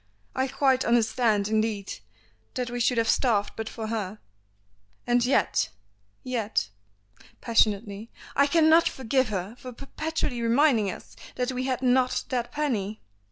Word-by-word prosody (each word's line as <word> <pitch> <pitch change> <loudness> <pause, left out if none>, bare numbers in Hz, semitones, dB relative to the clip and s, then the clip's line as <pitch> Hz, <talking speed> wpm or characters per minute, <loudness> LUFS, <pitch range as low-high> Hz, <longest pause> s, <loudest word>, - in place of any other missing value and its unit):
I 260 +1 +1
quite 265 -1 +2
understand, 225 -3 +2
indeed, 215 - -1 0.6
that 250 -1 -2
we 245 - -3
should 245 +1 +2
have 230 -1 +2
starved 220 -4 +2
but 220 0 -4
for 225 - -6
her, 215 -2 -3 0.9
and 245 0 +2
yet 255 +3 +2 0.5
yet 220 - -1 0.4
" - - -41 0.3
passionately, 215 -1 +1 0.3
"I 280 +1 +4
cannot 320 +2 +5
forgive 260 -1 0
her 195 +2 -4
for 255 - -8
perpetually 275 0 -4
reminding 230 -3 +3
us - - -9 0.2
that 250 +1 -1
we 255 0 -3
had 260 -1 -2
not 255 0 +2
that 245 -2 -2
penny!" 225 -9 -2
240 Hz, 140 wpm, -26 LUFS, 220-260 Hz, 0.9 s, cannot